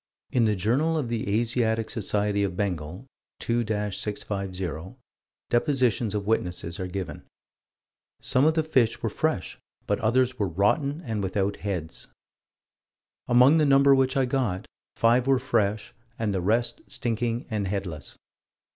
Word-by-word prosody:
In 120 -3 +3
the 105 -1 +2
Journal 130 - +1
of 135 -6 -2
the 110 -2 0
Asiatic 115 -2 0
Society 105 -2 0
of 95 -3 -2
Bengal, 90 +1 -3 0.3
2 120 0 0 0.3
650, 95 -4 -4 0.6
depositions 120 -5 +1
of 100 -1 -2
witnesses 90 -5 -2
are 95 - -3
given: 90 -5 -6 0.9
"Some 130 +3 +2
of 160 +1 +3
the 160 - +2
fish 130 -7 +1
were 115 - +1
fresh, 155 - -2 0.3
but - - 0
others 125 +2 +1
were 100 - +1
rotten 140 - +1
and 110 -4 -2
without 100 +1 -1
heads." 90 -6 -5 1.2
"Among 125 +6 +6
the 155 - +4
number 140 0 +6
which 135 0 +2
I 135 - +3
got, 125 -8 -1 0.3
five 120 +3 +3
were 135 -1 +4
fresh 110 -5 0 0.2
and 110 -3 -1
the 95 - -1
rest 115 - +1
stinking 120 0 -2
and 105 -3 -1
headless." 95 -6 -5
110 Hz, 140 wpm, -26 LUFS, 100-125 Hz, 1.2 s, Among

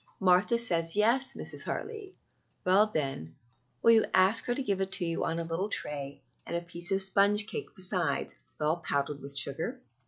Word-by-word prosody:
"Martha 190 +5 +3
says 170 -8 0
yes, 235 +6 +2
Mrs. - - -3
Hartley." 425 -4 -6 0.5
"Well, 195 +4 +4
then, 135 - -4 0.5
will 230 - +6
you 225 -1 +4
ask 190 +4 +4
her 245 - -1
to 275 - -3
give 200 -5 -1
it 190 0 -2
to 180 - +4
you 165 0 -2
on 165 - -2
a 170 - -2
little 165 +5 -3
tray, 140 -7 -4 0.2
and - - -6
a 170 - -2
piece 170 +1 -3
of 195 0 +3
sponge 200 +2 +4
cake - - -7
besides, 185 -3 +1 0.3
well 155 +2 0
powdered 140 -3 -3
with 140 +1 -4
sugar?" 140 +3 0
185 Hz, 185 wpm, -29 LUFS, 165-210 Hz, 0.5 s, will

